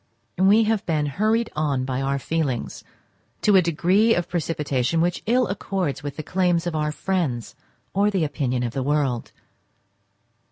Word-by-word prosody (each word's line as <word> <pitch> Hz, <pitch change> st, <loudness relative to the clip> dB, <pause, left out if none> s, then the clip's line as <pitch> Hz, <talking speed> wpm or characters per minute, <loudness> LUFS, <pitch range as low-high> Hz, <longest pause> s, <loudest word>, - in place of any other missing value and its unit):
We 200 Hz, +4 st, +5 dB
have 220 Hz, -1 st, 0 dB
been 155 Hz, -3 st, +1 dB
hurried 215 Hz, -, 0 dB
on 145 Hz, -4 st, 0 dB
by 130 Hz, 0 st, -2 dB
our 135 Hz, 0 st, 0 dB
feelings 140 Hz, -3 st, -2 dB, 0.6 s
to 210 Hz, -, +5 dB
a 190 Hz, -, +7 dB
degree 180 Hz, +7 st, +3 dB
of 175 Hz, 0 st, -1 dB
precipitation 150 Hz, -4 st, -1 dB
which 175 Hz, +1 st, 0 dB
ill 250 Hz, +2 st, +3 dB
accords 190 Hz, -6 st, -2 dB
with 145 Hz, -1 st, -6 dB
the 155 Hz, -, -5 dB
claims 180 Hz, -1 st, +1 dB
of 175 Hz, -2 st, -2 dB
our 150 Hz, -1 st, 0 dB
friends 150 Hz, -, -2 dB, 0.4 s
or 200 Hz, +2 st, +3 dB
the 190 Hz, -5 st, 0 dB
opinion 130 Hz, -4 st, -1 dB
of 120 Hz, -1 st, -3 dB
the 135 Hz, -, -2 dB
world. 135 Hz, -3 st, 0 dB
165 Hz, 160 wpm, -23 LUFS, 140-190 Hz, 0.6 s, a